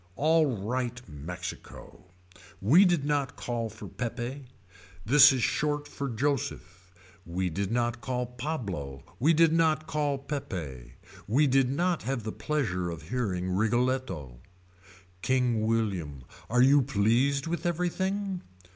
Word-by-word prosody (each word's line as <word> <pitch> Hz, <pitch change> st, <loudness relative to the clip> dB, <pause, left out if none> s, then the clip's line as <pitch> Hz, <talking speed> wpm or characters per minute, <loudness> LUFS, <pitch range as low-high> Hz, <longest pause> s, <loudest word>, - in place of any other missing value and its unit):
Alright 125 Hz, -5 st, 0 dB
Mexico. 85 Hz, +5 st, -8 dB, 0.5 s
We 155 Hz, -, +6 dB
did 175 Hz, -6 st, +2 dB
not 145 Hz, -2 st, 0 dB
call 115 Hz, -2 st, -3 dB
for 110 Hz, +2 st, -10 dB
Peppe. 125 Hz, +3 st, -5 dB, 0.6 s
This 140 Hz, +4 st, +8 dB
is 130 Hz, -3 st, 0 dB
short 145 Hz, -1 st, 0 dB
for 140 Hz, -1 st, -4 dB
Joseph. 115 Hz, -7 st, -3 dB, 0.3 s
We 90 Hz, +1 st, -2 dB
did 100 Hz, +4 st, -2 dB
not 120 Hz, 0 st, 0 dB
call 125 Hz, -1 st, -2 dB
Pablo. 115 Hz, -, -5 dB, 0.2 s
We 155 Hz, +7 st, +4 dB
did 165 Hz, 0 st, +5 dB
not 160 Hz, -1 st, +2 dB
call 150 Hz, -3 st, -1 dB
Peppe. 80 Hz, -, -6 dB, 0.3 s
We 135 Hz, +9 st, +3 dB
did 135 Hz, -2 st, +3 dB
not 170 Hz, +5 st, 0 dB
have 130 Hz, -2 st, -3 dB
the 110 Hz, -, -3 dB
pleasure 100 Hz, -, -2 dB
of 80 Hz, -1 st, -8 dB
hearing 95 Hz, -7 st, -1 dB
Rigoletto. 110 Hz, -, -1 dB, 0.9 s
William 110 Hz, -, +1 dB
King. 65 Hz, -, -13 dB, 0.3 s
Are 125 Hz, +2 st, +4 dB
you 140 Hz, +2 st, +6 dB
pleased 130 Hz, +3 st, +2 dB
with 170 Hz, +1 st, -2 dB
everything. 190 Hz, +2 st, -1 dB
125 Hz, 125 wpm, -28 LUFS, 100-145 Hz, 0.9 s, This